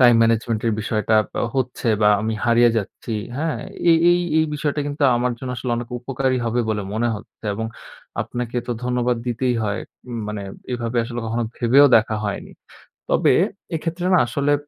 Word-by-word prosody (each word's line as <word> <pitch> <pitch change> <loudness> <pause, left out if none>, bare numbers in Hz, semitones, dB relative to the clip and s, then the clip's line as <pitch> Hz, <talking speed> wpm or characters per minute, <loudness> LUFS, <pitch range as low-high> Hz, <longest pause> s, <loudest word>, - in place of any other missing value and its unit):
Time 120 -2 +7
management 115 -1 +1
এর 115 - +2
বিষয়টা 110 0 +1 0.4
হচ্ছে 125 -2 -1
বা 105 - +6
আমি 110 +1 -1
হারিয়ে 120 0 +5
যাচ্ছি। 110 +2 -4 0.2
হ্যাঁ? 160 +1 -1 0.3
এই 165 - +7
এই 175 - +4 0.2
এই 160 - +4
বিষয়টা 145 0 -1
কিন্তু 145 +1 -4
আমার 125 +1 0
জন্য 130 +1 -5
আসলে 125 +1 -3
অনেক 120 0 -5
উপকারী 130 +1 0
হবে 120 +1 +1
বলে 105 -1 -1
মনে 120 +2 +1
হচ্ছে 105 +1 -12
এবং 110 +1 -3 0.6
আপনাকে 120 0 -5
তো 120 - -1
ধন্যবাদ 125 -1 +1
দিতেই 120 +1 0
হয়। 105 0 -1 0.3
উম 120 -2 -4
মানে 105 -1 -4 0.3
এভাবে 120 0 -3
আসলে 120 0 -5
কখনো 115 +1 -1
ভেবেও 130 +4 +6
দেখা 110 0 +1
হয়নি। 100 - -4 0.6
তবে - - +4 0.4
এক্ষেত্রে 170 +2 -3
না 180 - +6
আসলে 140 +4 0
120 Hz, 170 wpm, -22 LUFS, 115-130 Hz, 0.6 s, Time